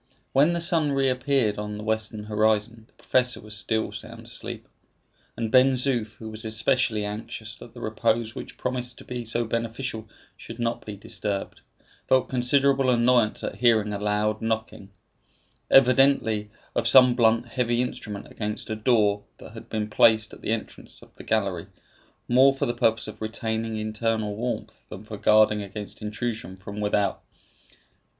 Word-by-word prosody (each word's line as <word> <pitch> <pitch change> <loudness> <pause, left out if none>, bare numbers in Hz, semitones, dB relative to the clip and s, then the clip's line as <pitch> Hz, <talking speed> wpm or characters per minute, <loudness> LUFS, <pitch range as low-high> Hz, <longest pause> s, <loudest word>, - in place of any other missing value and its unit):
When 145 +6 +4
the 170 - -1
sun 160 -4 +2
reappeared 130 -4 +1
on 105 0 -5
the 105 - -7
western 110 -1 -2
horizon 110 +1 0
the - - -32
professor 125 -1 +1
was 105 0 -7
still 110 +1 -1
sound - - -9
asleep; - - -6 0.7
and 115 -2 -2
Ben 130 +2 +6
Zoof, 120 -4 -1
who 110 - -9
was 110 0 -9
especially 110 0 +1
anxious 105 +2 -6
that - - -13
the - - -9
repose 115 0 0
which - - -9
promised 125 -1 -2
to - - -12
be 125 -1 -5
so 115 +1 0
beneficial 115 0 -4 0.3
should 115 - -10
not 120 -1 -2
be 105 - -5
disturbed, 100 0 -5 0.5
felt 130 -1 +3
considerable 135 +1 +2
annoyance 120 -2 +3
at - - -4
hearing 110 -3 +3
a 100 - -3
loud 105 +1 0
knocking, 110 -3 -3 0.8
evidently 130 -5 +4 0.2
of - - 0
some 125 -2 +7
blunt 115 0 +2
heavy 120 -1 0
instrument 105 -4 -4
against 105 +1 -5
a - - -1
door 105 -3 +2 0.2
that - - -12
had - - -11
been 105 -1 -2
placed 110 0 +4
at - - -12
the - - -5
entrance 115 -1 -5
of - - -19
the - - -12
gallery, 100 -6 -1 0.6
more 130 +3 +5
for - - -1
the 120 - -1
purpose 115 -3 +1
of 110 0 -9
retaining 110 0 -3
internal 110 -1 -1
warmth 120 +3 -3 0.2
than 95 - -9
for 110 -1 -8
guarding 105 0 +4
against 100 +1 -8
intrusion 105 -3 -4
from 100 +2 -8
without. 105 -1 0
110 Hz, 160 wpm, -25 LUFS, 105-125 Hz, 0.8 s, some